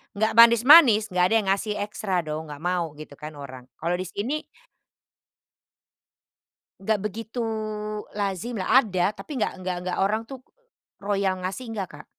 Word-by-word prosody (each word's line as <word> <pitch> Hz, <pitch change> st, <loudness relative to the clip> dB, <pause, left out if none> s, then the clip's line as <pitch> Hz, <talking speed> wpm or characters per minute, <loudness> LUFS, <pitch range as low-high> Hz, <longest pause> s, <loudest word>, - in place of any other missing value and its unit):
nggak 220 Hz, +2 st, 0 dB
manis-manis, 235 Hz, 0 st, +7 dB
nggak 180 Hz, 0 st, +3 dB
ada 225 Hz, -, +4 dB
yang 210 Hz, -3 st, +1 dB
ngasih 205 Hz, +2 st, -1 dB
ekstra 195 Hz, -4 st, -2 dB
dong. 155 Hz, +1 st, -5 dB
Nggak 145 Hz, +1 st, -10 dB
mau 175 Hz, -4 st, -1 dB
gitu 150 Hz, -1 st, -11 dB
kan 150 Hz, 0 st, -8 dB
orang. 130 Hz, -3 st, -10 dB
Kalau 170 Hz, +2 st, -2 dB
di 185 Hz, -, -4 dB
sini 240 Hz, -, -4 dB, 2.3 s
enggak 210 Hz, +1 st, 0 dB
begitu 225 Hz, +3 st, -5 dB, 0.8 s
lazim 205 Hz, +3 st, -3 dB
lah, 205 Hz, +5 st, +4 dB
ada, 190 Hz, -3 st, 0 dB
tapi 285 Hz, +7 st, -9 dB
nggak -, -, 0 dB
nggak 185 Hz, 0 st, -3 dB
nggak 180 Hz, 0 st, -3 dB
orang 215 Hz, +4 st, +1 dB
tuh 265 Hz, +3 st, -10 dB, 0.6 s
royal 195 Hz, -2 st, -1 dB
ngasih, 195 Hz, +7 st, -5 dB
nggak 195 Hz, -4 st, -4 dB
Kak. 150 Hz, +1 st, -13 dB
195 Hz, 155 wpm, -25 LUFS, 180-220 Hz, 2.3 s, manis-manis